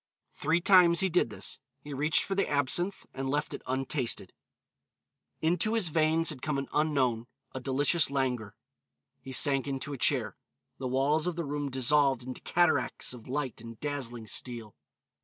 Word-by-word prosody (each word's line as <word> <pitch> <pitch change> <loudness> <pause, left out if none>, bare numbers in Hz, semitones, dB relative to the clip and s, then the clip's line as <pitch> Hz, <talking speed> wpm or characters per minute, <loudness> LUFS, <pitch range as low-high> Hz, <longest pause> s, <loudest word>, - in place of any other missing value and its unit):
Three 160 +3 +1
times 180 -2 +6
he 190 - +2
did 175 -8 +2
this. 105 - -6 0.2
He 145 - -7
reached 150 +3 +2
for 195 - -2
the 195 - 0
absinthe 145 +7 0
and 135 0 -3
left 145 +2 -1
it - - -6
untasted. 130 -1 -2 1.1
Into 180 +7 +1
his 205 -7 +1
veins 160 +1 +2
had 135 -4 -9
come 150 -2 -1
an 135 - -3
unknown, 130 -7 +1 0.3
a 130 - -4
delicious 140 +5 +2
languor. 125 -7 -2 0.7
He 135 - -9
sank 135 +1 +3
into 140 +1 -4
a 135 - -6
chair. - - +1 0.4
The 130 - -3
walls 140 +5 +1
of 180 - -1
the 170 -1 -3
room 145 0 -3
dissolved 135 0 +2
into 130 0 -7
cataracts 160 -8 +1
of 120 -3 -12
light 130 -4 -3
and 115 -1 -10
dazzling 130 -6 -4
steel. 115 -1 -4
140 Hz, 165 wpm, -29 LUFS, 130-160 Hz, 1.1 s, times